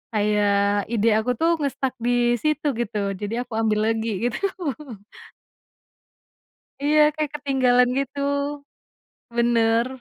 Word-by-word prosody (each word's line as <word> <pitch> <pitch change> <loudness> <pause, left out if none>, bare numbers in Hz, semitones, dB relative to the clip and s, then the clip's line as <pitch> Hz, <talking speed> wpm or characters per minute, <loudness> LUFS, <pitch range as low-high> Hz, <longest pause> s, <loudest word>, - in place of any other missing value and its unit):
kayak 205 -1 +1
ide 230 -1 +1
aku 245 +3 -1
tuh 330 +5 +1
nge-stuck 275 -2 -2
disitu, 245 +5 +1
gitu, 210 -4 -2
jadi 225 +4 -3
aku 245 - -30
ambil 215 0 +1
lagi, 225 +1 -2
gitu. - - -5 2.4
Iya, 300 +1 +3 0.2
kayak 305 -2 -2
ketinggalan 255 -3 +2
gitu, 275 +1 -4 1.2
bener. 235 0 +2
240 Hz, 100 wpm, -23 LUFS, 215-265 Hz, 2.4 s, Iya